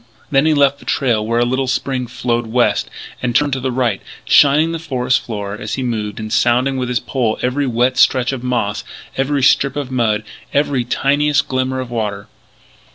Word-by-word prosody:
Then 135 Hz, +3 st, +3 dB
he 155 Hz, -, +3 dB
left 140 Hz, -1 st, +3 dB
the -, -, -16 dB
trail 120 Hz, -6 st, +1 dB
where 115 Hz, +2 st, -1 dB
a 120 Hz, -, +3 dB
little 130 Hz, +2 st, -1 dB
spring 130 Hz, -1 st, -1 dB
flowed 120 Hz, -1 st, -2 dB
west, 120 Hz, +2 st, +1 dB, 0.3 s
and 120 Hz, -2 st, -2 dB
turned 145 Hz, -2 st, +2 dB
to 130 Hz, -, -1 dB
the 130 Hz, 0 st, -2 dB
right, 120 Hz, -5 st, 0 dB, 0.2 s
shining 150 Hz, +3 st, +5 dB
the 165 Hz, -, -3 dB
forest 130 Hz, -5 st, 0 dB
floor 100 Hz, -3 st, -5 dB
as 110 Hz, -, -4 dB
he 130 Hz, -, -3 dB
moved 110 Hz, -4 st, -3 dB
and 110 Hz, 0 st, -5 dB
sounding 125 Hz, +4 st, +2 dB
with 125 Hz, -1 st, -2 dB
his 125 Hz, -1 st, +1 dB
pole 120 Hz, -5 st, -1 dB
every 135 Hz, +3 st, 0 dB
wet 125 Hz, +1 st, +1 dB
stretch 130 Hz, -1 st, +3 dB
of 130 Hz, -2 st, -5 dB
moss, 110 Hz, -5 st, -1 dB, 0.3 s
every 135 Hz, +1 st, 0 dB
strip 135 Hz, +1 st, +3 dB
of 140 Hz, -3 st, -4 dB
mud, 110 Hz, -4 st, +1 dB, 0.3 s
every 140 Hz, -3 st, +1 dB
tiniest 140 Hz, +3 st, +1 dB
glimmer 130 Hz, 0 st, -1 dB
of 130 Hz, -2 st, -6 dB
water. 105 Hz, -4 st, -3 dB
125 Hz, 195 wpm, -17 LUFS, 120-135 Hz, 0.3 s, shining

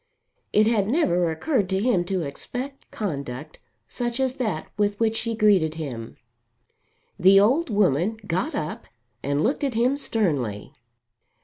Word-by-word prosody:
It 215 Hz, -, +4 dB
had 215 Hz, -3 st, +2 dB
never 180 Hz, -, +2 dB
occurred 200 Hz, -, 0 dB
to 190 Hz, 0 st, +1 dB
him 205 Hz, -5 st, +2 dB
to 185 Hz, -1 st, -1 dB
expect 250 Hz, -, -6 dB
conduct 145 Hz, -, -5 dB, 0.3 s
such 240 Hz, 0 st, -3 dB
as 260 Hz, 0 st, 0 dB
that 215 Hz, -11 st, -2 dB
with 205 Hz, 0 st, 0 dB
which 225 Hz, -1 st, +2 dB
she 230 Hz, 0 st, -2 dB
greeted 195 Hz, -8 st, +3 dB
him. 125 Hz, -8 st, -6 dB, 1.0 s
The 190 Hz, +2 st, +7 dB
old 260 Hz, +11 st, +3 dB
woman 200 Hz, 0 st, +2 dB
got 180 Hz, +1 st, -1 dB
up 155 Hz, +1 st, -4 dB, 0.3 s
and 140 Hz, +2 st, 0 dB
looked 280 Hz, +5 st, 0 dB
at 270 Hz, -5 st, -1 dB
him 250 Hz, +5 st, +2 dB
sternly. 145 Hz, -, -1 dB
205 Hz, 140 wpm, -24 LUFS, 160-235 Hz, 1.0 s, The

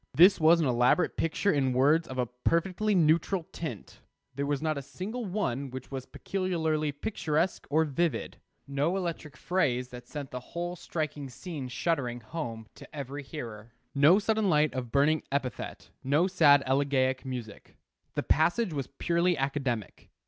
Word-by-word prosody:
This 180 Hz, +6 st, +7 dB
was 165 Hz, +2 st, +6 dB
an 160 Hz, -, +2 dB
elaborate 125 Hz, +6 st, +3 dB
picture 165 Hz, +5 st, +1 dB
in 135 Hz, -3 st, +1 dB
words 145 Hz, +6 st, +3 dB
of 130 Hz, -, -7 dB
a 125 Hz, -, +1 dB
perfectly 170 Hz, -, 0 dB
neutral 170 Hz, +2 st, +3 dB
tint. 155 Hz, -, -7 dB, 0.3 s
There 140 Hz, 0 st, -2 dB
was 145 Hz, -1 st, 0 dB
not 155 Hz, +1 st, 0 dB
a 140 Hz, -, -4 dB
single 215 Hz, -, -5 dB
one 140 Hz, -, -2 dB
which 130 Hz, +1 st, -8 dB
was 130 Hz, -1 st, -5 dB
peculiarly 160 Hz, -6 st, -1 dB
picturesque 160 Hz, +1 st, -1 dB
or 160 Hz, +2 st, +3 dB
vivid; 160 Hz, +2 st, -1 dB, 0.3 s
no 140 Hz, +7 st, 0 dB
electric 165 Hz, -6 st, -4 dB
phrase 125 Hz, -9 st, 0 dB
that 125 Hz, -1 st, -10 dB
sent 145 Hz, -3 st, -6 dB
the 125 Hz, -, -4 dB
whole 175 Hz, +7 st, -5 dB
striking 155 Hz, -5 st, -4 dB
scene 145 Hz, +1 st, -6 dB
shuddering 125 Hz, -2 st, -1 dB
home 115 Hz, -3 st, -5 dB
to -, -, -14 dB
every 140 Hz, 0 st, -5 dB
hearer; 115 Hz, -6 st, -8 dB, 0.2 s
no 150 Hz, +6 st, +6 dB
sudden 215 Hz, -1 st, +1 dB
light 150 Hz, -2 st, +3 dB
of 125 Hz, -3 st, -4 dB
burning 145 Hz, +2 st, +3 dB
epithet, 140 Hz, -3 st, -4 dB
no 145 Hz, +6 st, +3 dB
sad 150 Hz, -7 st, +5 dB
elegiac 130 Hz, -1 st, +1 dB
music. 125 Hz, -5 st, -7 dB, 0.4 s
The -, -, 0 dB
passage 175 Hz, +5 st, +2 dB
was 140 Hz, -4 st, -3 dB
purely 170 Hz, 0 st, +1 dB
academic. 135 Hz, -5 st, -3 dB
150 Hz, 155 wpm, -29 LUFS, 130-170 Hz, 0.4 s, This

